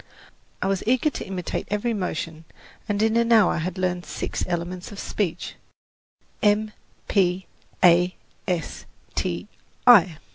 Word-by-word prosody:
I - - 0
was 195 -1 0
eager 255 +5 +3
to - - -6
imitate 185 -2 -4
every 210 +4 0
motion 165 -5 -4 0.4
and 205 +1 +1
in 220 0 +2
an 235 0 +2
hour 220 -5 +5
had 180 +3 -3
learned 180 -1 -1
six - - -4
elements 175 +2 -4
of 205 - -9
speech: 190 -6 -3 0.8
M, 210 +1 +2 0.4
P, 185 -2 +1 0.4
A, 180 +1 +5 0.3
S, 180 -3 -3 0.3
T, - - -2 0.4
I. 190 -10 +7
185 Hz, 135 wpm, -24 LUFS, 175-215 Hz, 0.8 s, I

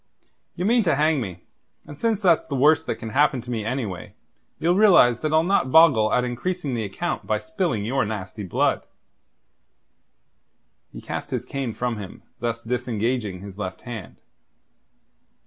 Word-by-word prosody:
Ye 180 - -2
mean 235 +3 +4
to 160 - +3
hang 150 -1 +2
me, 90 -6 -7 0.4
and 145 0 -11
since 225 -3 0
that's 170 -4 +3
the 140 - -3
worst 155 +4 +4
that - - -1
can 115 - -7
happen 140 0 +3
to 125 +1 -8
me 110 -3 -2
anyway, 110 -6 -4 0.4
you'll 170 +3 +2
realize 175 - +5
that 155 - -1
I'll 160 +1 +4
not 175 -8 +1
boggle 135 -10 +6
at 125 - +2
increasing 140 +5 -3
the 115 -2 -1
account 170 - -4
by - - +1
spilling 180 - -2
your 135 +4 +1
nasty 105 -1 -5
blood." 95 -4 0 2.1
He - - -9
cast - - -5
his - - -3
cane 135 -5 -4
from 120 -1 -2
him, 100 -3 -9 0.2
thus 115 0 -3
disengaging 115 -4 -2
his 100 0 -10
left 95 -2 -5
hand. 115 -6 -8
125 Hz, 165 wpm, -23 LUFS, 110-160 Hz, 2.1 s, boggle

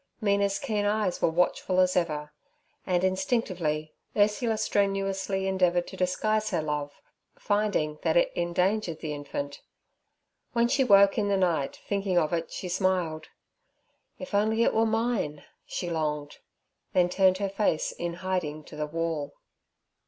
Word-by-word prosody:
Mina's 200 -2 +2
keen 210 -2 -1
eyes 205 -2 0
were - - +4
watchful 180 +2 +1
as 185 0 +3
ever, 150 -4 -1 0.5
and 180 -1 +1
instinctively 185 -6 -1 0.2
Ursula 215 +2 +2
strenuously 195 -2 0
endeavoured 180 -2 +2
to - - -9
disguise 215 +4 0
her 170 -5 -1
love, 150 -1 -4 0.3
finding 205 -8 0
that 165 0 +2
it - - +3
endangered 175 0 0
the 155 -2 -3
infant. 145 -1 -5 0.9
When 235 -1 +3
she 265 +2 +2
woke 200 -3 +6
in 205 - +1
the 200 -1 +2
night 170 -7 0
thinking 195 -2 0
of 160 0 +2
it 165 -1 -2
she 185 - -5
smiled. 175 -4 0 0.9
'If 275 - -9
only 220 +3 +2
it - - +2
were 225 +1 +3
mine!' 220 -10 -1 0.2
she 180 - -4
longed, 150 -2 -2 0.5
then 180 -1 +4
turned 185 +1 +3
her 200 0 -1
face 195 -5 0
in 170 -1 -4
hiding 155 -5 -2
to 150 - -12
the 150 0 -3
wall. 165 -2 -3
185 Hz, 145 wpm, -27 LUFS, 160-205 Hz, 0.9 s, woke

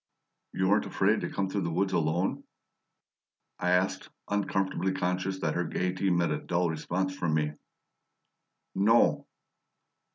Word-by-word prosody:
"You 95 - +1
weren't 105 +2 +3
afraid 105 +3 +2
to - - -3
come 100 -1 -1
through 100 +1 -2
the 85 - -1
woods 95 +4 0
alone?" 85 +3 0 1.2
I 90 - 0
asked, 90 +1 +1 0.2
uncomfortably 95 -2 0
conscious 95 0 -1
that 80 - 0
her 90 - 0
gaiety 90 +3 -1
met 85 -1 +2
a - - -1
dull 85 -1 0
response 95 +4 -2
from 85 -4 0
me. 75 -1 0 1.2
"No." 110 +4 +3
90 Hz, 135 wpm, -29 LUFS, 85-95 Hz, 1.2 s, weren't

